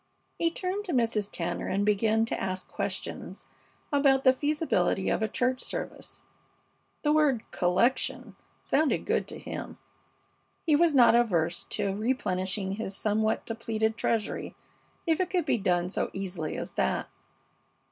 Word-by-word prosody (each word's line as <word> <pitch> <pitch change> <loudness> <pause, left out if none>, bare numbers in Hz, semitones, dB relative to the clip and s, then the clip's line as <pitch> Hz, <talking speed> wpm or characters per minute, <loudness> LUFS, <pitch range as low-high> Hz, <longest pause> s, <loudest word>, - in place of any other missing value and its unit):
He 335 - +3
turned 370 +4 -3
to 355 - -3
Mrs. 225 -5 +1
Tanner 175 0 -3
and 200 +2 0
began 220 +2 +3
to - - -3
ask 185 -1 -3
questions - - -4 0.5
about 275 -2 +4
the 260 - +7
feasibility 290 - 0
of - - 0
a 220 - +2
church 255 +4 0
service. - - -6 0.8
The 295 - +3
word 285 -7 +3
"collection" 235 +5 +1 0.3
sounded 305 +1 +1
good - - 0
to - - -6
him. - - -7 0.9
He 310 -3 +4
was 325 -1 +4
not 245 -3 +7
averse 175 -8 +2
to 195 -1 -1
replenishing 195 -4 -1
his 200 -3 -4
somewhat 215 +1 0
depleted 220 -1 -1
treasury 225 -2 -1 0.5
if 325 -2 +2
it 370 -1 0
could 360 -4 0
be 240 - +1
done 180 -2 +1
so - - -1
easily 180 -5 -4
as - - -5
that. 65 - 0
225 Hz, 145 wpm, -28 LUFS, 195-270 Hz, 0.9 s, the